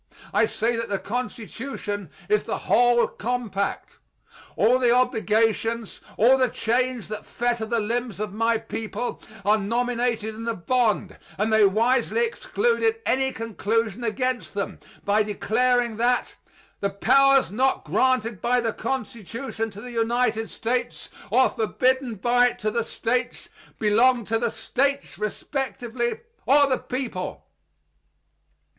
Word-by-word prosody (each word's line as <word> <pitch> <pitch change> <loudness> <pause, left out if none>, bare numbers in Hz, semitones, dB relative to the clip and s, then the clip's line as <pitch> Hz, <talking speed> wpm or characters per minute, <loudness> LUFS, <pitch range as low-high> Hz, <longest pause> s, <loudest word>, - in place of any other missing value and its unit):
I - - +4
say 235 - 0
that 230 - -3
the 200 - 0
Constitution 225 - -5 0.2
is 425 0 +3
the - - -3
whole 240 -1 +3
compact. 220 -4 -3 0.6
All 250 +4 +4
the 245 -2 +3
obligations, 225 -2 +1 0.2
all 255 +4 +5
the 255 -1 +3
chains 245 +1 -1
that 215 -1 -5
fetter 240 -2 -2
the 235 0 0
limbs 230 0 -2
of 210 -2 -3
my 230 +1 +2
people, 225 +2 -5 0.2
are 210 +1 +4
nominated 235 0 -1
in 225 +1 -7
the 230 -1 -1
bond, 225 +3 0 0.2
and 215 +2 0
they 220 -1 +6
wisely 240 - +2
excluded 465 -1 0
any 265 0 +1
conclusion 225 0 -2
against 250 +1 -2
them, 200 -1 -3 0.3
by 205 +2 +3
declaring 235 +3 +1
that 245 +2 +1 0.4
"the 200 - 0
powers 270 +5 +4
not 260 +5 +1
granted 240 -5 +1
by 250 +1 +2
the 230 -2 -1
Constitution 230 -2 -4
to 205 0 -11
the 250 - -8
United 230 -1 0
States, 240 +1 -3 0.2
or 255 +5 +5
forbidden 255 +2 0
by 245 +4 +3
it 245 - -4
to 215 - -1
the 235 +1 0
States, 245 +2 -2 0.3
belonged 230 +3 +3
to 225 0 +1
the 235 0 0
States 280 +5 -1
respectively 240 - -3 0.3
or 285 +2 +6
the 260 -2 0
people." 245 -8 -5
235 Hz, 135 wpm, -24 LUFS, 220-255 Hz, 0.6 s, they